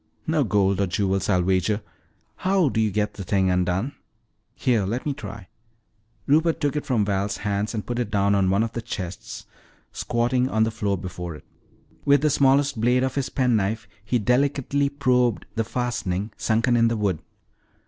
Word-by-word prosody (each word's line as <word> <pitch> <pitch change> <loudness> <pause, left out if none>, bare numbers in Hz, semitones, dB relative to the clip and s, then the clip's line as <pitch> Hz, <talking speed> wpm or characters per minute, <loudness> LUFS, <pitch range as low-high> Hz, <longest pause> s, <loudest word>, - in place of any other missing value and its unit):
"No 155 -2 +2
gold 100 -3 +2
or 100 - +1
jewels, 95 +1 0
I'll 90 -3 +3
wager. 95 +3 +1 0.6
How 185 -4 +2
do 110 - 0
you 110 - +2
get 105 +1 -1
the 100 - -7
thing 95 0 +1
undone?" 90 +8 0 0.6
"Here, 120 -5 +1
let 115 +7 -3
me 145 - 0
try." 110 -9 -9 0.8
Rupert 160 +3 +3
took 145 -2 0
it 150 - -3
from 115 -6 +2
Val's 100 0 -1
hands 105 +2 -1
and 105 - -3
put 120 0 -3
it 120 -4 -1
down 100 -1 +2
on 95 -2 +2
one 100 +3 +3
of 115 - -3
the 115 - -4
chests, 95 -6 -6 0.5
squatting 125 +2 0
on 110 -2 +2
the 110 - 0
floor 100 -2 -1
before 90 -2 -6
it. - - -14 0.6
With 140 -1 +4
the 150 0 +2
smallest 140 -3 +3
blade 125 +2 +3
of 130 -1 -1
his 135 -2 -2
penknife 110 -4 0 0.2
he 120 +4 0
delicately 140 +4 +1
probed 125 -5 +1
the 115 - 0
fastening 110 -4 -2
sunken 115 +2 +1
in 115 -1 +4
the 115 0 0
wood. 100 -6 0
110 Hz, 180 wpm, -24 LUFS, 100-130 Hz, 0.8 s, With